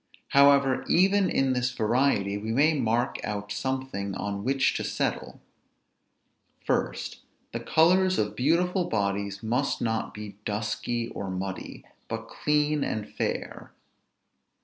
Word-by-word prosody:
However, 140 Hz, -1 st, +5 dB
even 195 Hz, +2 st, +4 dB
in 135 Hz, -1 st, +2 dB
this 125 Hz, 0 st, +1 dB
variety, 110 Hz, -4 st, +1 dB
we 105 Hz, +2 st, -3 dB
may 145 Hz, +7 st, +4 dB
mark 120 Hz, -4 st, 0 dB
out 105 Hz, -1 st, -4 dB
something 130 Hz, -5 st, -3 dB
on 100 Hz, 0 st, -3 dB
which 135 Hz, +2 st, +2 dB
to -, -, -3 dB
settle. -, -, -2 dB, 1.3 s
First, -, -, -1 dB, 0.3 s
the -, -, -3 dB
colors 185 Hz, +3 st, +3 dB
of 105 Hz, -, -1 dB
beautiful 175 Hz, +7 st, +2 dB
bodies 100 Hz, -2 st, -2 dB
must 125 Hz, +5 st, 0 dB
not 115 Hz, -1 st, -1 dB
be 105 Hz, -2 st, -9 dB
dusky 110 Hz, +3 st, -2 dB
or 100 Hz, -, -5 dB
muddy, 95 Hz, +1 st, -5 dB, 0.2 s
but -, -, -5 dB
clean 150 Hz, -1 st, +1 dB
and 105 Hz, -1 st, -3 dB
fair. -, -, -4 dB
120 Hz, 125 wpm, -27 LUFS, 105-140 Hz, 1.3 s, However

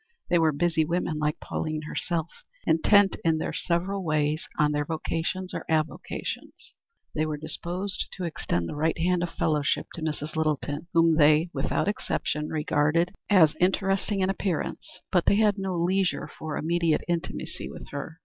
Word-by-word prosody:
They 175 Hz, -, +5 dB
were 160 Hz, -1 st, +4 dB
busy 160 Hz, +2 st, +1 dB
women 165 Hz, -1 st, -1 dB
like 150 Hz, 0 st, 0 dB
Pauline 155 Hz, -1 st, -3 dB
herself, 170 Hz, -, -3 dB, 0.2 s
intent 195 Hz, +4 st, +4 dB
in 165 Hz, -1 st, +3 dB
their -, -, -3 dB
several 185 Hz, +3 st, -1 dB
ways 155 Hz, -1 st, 0 dB
on 150 Hz, 0 st, +3 dB
their 145 Hz, 0 st, 0 dB
vocations 165 Hz, +4 st, -3 dB
or -, -, -4 dB
avocations. 155 Hz, -1 st, -3 dB, 0.4 s
They 155 Hz, 0 st, 0 dB
were 150 Hz, -1 st, -2 dB
disposed 175 Hz, +5 st, -1 dB
to 185 Hz, -, -6 dB
extend 85 Hz, -, -2 dB
the -, -, -5 dB
right 160 Hz, +3 st, +1 dB
hand 180 Hz, +1 st, +1 dB
of 175 Hz, -, -1 dB
fellowship 150 Hz, -4 st, 0 dB
to 170 Hz, -, -7 dB
Mrs. 155 Hz, -1 st, -3 dB
Littleton, 155 Hz, 0 st, -1 dB
whom 165 Hz, -1 st, +4 dB
they 155 Hz, +2 st, +5 dB
without -, -, 0 dB
exception 150 Hz, -6 st, -1 dB
regarded 155 Hz, +2 st, +1 dB, 0.2 s
as 170 Hz, -7 st, +6 dB
interesting 195 Hz, +2 st, +1 dB
in 190 Hz, +1 st, +2 dB
appearance, 185 Hz, -1 st, -3 dB
but 180 Hz, -2 st, +2 dB
they -, -, +6 dB
had 210 Hz, -1 st, +3 dB
no 190 Hz, -1 st, -2 dB
leisure 175 Hz, -2 st, +1 dB
for 155 Hz, -1 st, -6 dB
immediate 165 Hz, 0 st, +1 dB
intimacy 170 Hz, -1 st, -3 dB
with -, -, -10 dB
her. 145 Hz, +3 st, -6 dB
165 Hz, 160 wpm, -27 LUFS, 155-180 Hz, 0.4 s, as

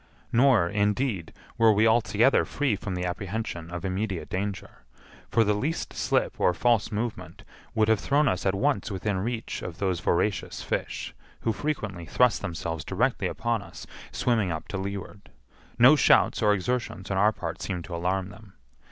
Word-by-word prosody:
Nor, 120 Hz, -7 st, +4 dB
indeed, 105 Hz, -1 st, 0 dB, 0.3 s
were 115 Hz, -1 st, +6 dB
we 105 Hz, +1 st, +3 dB
altogether 115 Hz, +2 st, +4 dB
free 140 Hz, -7 st, 0 dB
from 100 Hz, -1 st, -5 dB
the 90 Hz, 0 st, -2 dB
apprehension 90 Hz, -2 st, -4 dB
of 85 Hz, +2 st, -5 dB
immediate 95 Hz, 0 st, -3 dB
danger, 95 Hz, -8 st, -4 dB, 0.5 s
for 115 Hz, -, +4 dB
the 105 Hz, -1 st, +2 dB
least 145 Hz, +11 st, -2 dB
slip -, -, 0 dB
or 90 Hz, -, +3 dB
false 120 Hz, 0 st, +2 dB
movement 110 Hz, +2 st, -4 dB, 0.3 s
would 110 Hz, -1 st, +3 dB
have 110 Hz, -2 st, +3 dB
thrown 145 Hz, +1 st, +2 dB
us 90 Hz, -6 st, 0 dB
at 95 Hz, -, +2 dB
once 140 Hz, +6 st, 0 dB
within 100 Hz, 0 st, -2 dB
reach 115 Hz, +3 st, -3 dB
of 90 Hz, -2 st, -6 dB
those 95 Hz, -3 st, -1 dB
voracious 100 Hz, +4 st, -1 dB
fish, -, -, -3 dB, 0.3 s
who 115 Hz, -, 0 dB
frequently 105 Hz, -, -4 dB
thrust 125 Hz, +7 st, +3 dB
themselves 80 Hz, -2 st, -4 dB
directly 120 Hz, +7 st, 0 dB
upon 115 Hz, -1 st, -1 dB
us, -, -, -11 dB, 0.3 s
swimming 110 Hz, -7 st, +1 dB
up 80 Hz, -1 st, -5 dB
to 105 Hz, -, -3 dB
leeward. 100 Hz, +1 st, -6 dB, 0.5 s
No 130 Hz, +6 st, +8 dB
shouts 140 Hz, -, +4 dB
or 105 Hz, -1 st, +4 dB
exertions 105 Hz, -2 st, -2 dB
on 95 Hz, -, 0 dB
our 105 Hz, +3 st, +5 dB
part 85 Hz, -6 st, -6 dB
seemed 90 Hz, -3 st, -3 dB
to 85 Hz, -, -6 dB
alarm 90 Hz, +2 st, -1 dB
them. 100 Hz, -1 st, -14 dB
105 Hz, 170 wpm, -27 LUFS, 95-115 Hz, 0.5 s, No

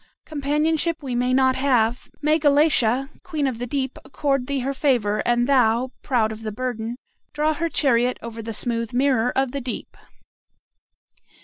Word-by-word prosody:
Companionship 310 Hz, +2 st, 0 dB
we 260 Hz, -3 st, -3 dB
may 250 Hz, +1 st, +1 dB
not 260 Hz, 0 st, +3 dB
have. 250 Hz, -2 st, +1 dB
May 305 Hz, +2 st, +3 dB
Galatea, 280 Hz, -4 st, +3 dB
queen 310 Hz, -5 st, -2 dB
of 255 Hz, -4 st, -2 dB
the 245 Hz, -, -3 dB
deep, 265 Hz, 0 st, -2 dB
accord 275 Hz, -3 st, -1 dB
thee 280 Hz, -2 st, -1 dB
her 275 Hz, +2 st, -2 dB
favor, 240 Hz, -7 st, +1 dB
and 240 Hz, 0 st, +3 dB
thou, 250 Hz, -2 st, +2 dB
proud 230 Hz, -5 st, +1 dB
of 220 Hz, 0 st, -8 dB
the 220 Hz, -1 st, -4 dB
burden, 235 Hz, 0 st, -4 dB, 0.4 s
draw 305 Hz, +1 st, +1 dB
her 335 Hz, +2 st, -2 dB
chariot 250 Hz, -5 st, +2 dB
over 230 Hz, -1 st, -7 dB
the 225 Hz, +1 st, -5 dB
smooth 230 Hz, +1 st, -1 dB
mirror 250 Hz, -2 st, +2 dB
of 270 Hz, -1 st, +1 dB
the 280 Hz, -, -4 dB
deep." 250 Hz, -1 st, -5 dB
260 Hz, 165 wpm, -23 LUFS, 235-280 Hz, 0.4 s, not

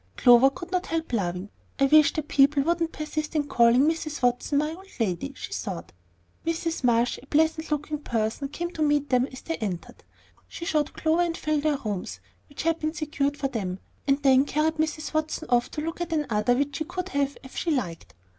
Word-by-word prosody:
Clover 245 Hz, +2 st, +7 dB
could 345 Hz, +6 st, -9 dB
not 365 Hz, 0 st, -1 dB
help 325 Hz, -5 st, -3 dB
laughing. 185 Hz, -2 st, -2 dB, 0.3 s
"I 275 Hz, -, +5 dB
wish 305 Hz, +2 st, +6 dB
that 310 Hz, -1 st, -3 dB
people 280 Hz, -1 st, +4 dB
wouldn't 335 Hz, +1 st, 0 dB
persist 305 Hz, 0 st, -4 dB
in 300 Hz, -, +2 dB
calling 240 Hz, -3 st, +4 dB
Mrs. 310 Hz, -2 st, -1 dB
Watson 245 Hz, +4 st, +1 dB
my 300 Hz, +2 st, +1 dB
old 380 Hz, +3 st, -12 dB
lady," 180 Hz, -, -1 dB
she -, -, -7 dB
thought. 85 Hz, 0 st, -5 dB, 0.5 s
Mrs. 330 Hz, -1 st, -2 dB
Marsh, 240 Hz, 0 st, +2 dB
a 275 Hz, -, -17 dB
pleasant 315 Hz, +2 st, +1 dB
looking 300 Hz, 0 st, -2 dB
person, 230 Hz, 0 st, -2 dB
came 345 Hz, +4 st, -4 dB
to 320 Hz, -, -6 dB
meet 290 Hz, -1 st, +2 dB
them 250 Hz, 0 st, +3 dB
as 260 Hz, -, -9 dB
they 330 Hz, -, -3 dB
entered. 190 Hz, -6 st, -5 dB, 0.4 s
She 340 Hz, -, -7 dB
showed 305 Hz, -3 st, 0 dB
Clover 320 Hz, +2 st, +1 dB
and 340 Hz, -1 st, 0 dB
Phil 305 Hz, -1 st, 0 dB
their 300 Hz, -1 st, +1 dB
rooms, 200 Hz, -, -4 dB, 0.3 s
which 285 Hz, -, -6 dB
had 330 Hz, 0 st, +1 dB
been 310 Hz, +1 st, -2 dB
secured 290 Hz, -2 st, -1 dB
for 280 Hz, -, 0 dB
them, 190 Hz, -7 st, -3 dB, 0.3 s
and 275 Hz, 0 st, +3 dB
then 265 Hz, -1 st, +6 dB
carried 315 Hz, +2 st, 0 dB
Mrs. 310 Hz, 0 st, -2 dB
Watson 315 Hz, +1 st, -1 dB
off 240 Hz, 0 st, +3 dB
to 300 Hz, -, -4 dB
look 325 Hz, +2 st, -4 dB
at 345 Hz, -, -3 dB
another 245 Hz, -7 st, +1 dB
which 280 Hz, +2 st, -1 dB
she 315 Hz, -, -1 dB
could 365 Hz, +2 st, -4 dB
have 280 Hz, -2 st, -1 dB
if 265 Hz, -, -12 dB
she 345 Hz, -, -2 dB
liked. 200 Hz, -, -3 dB
290 Hz, 205 wpm, -26 LUFS, 250-315 Hz, 0.5 s, Clover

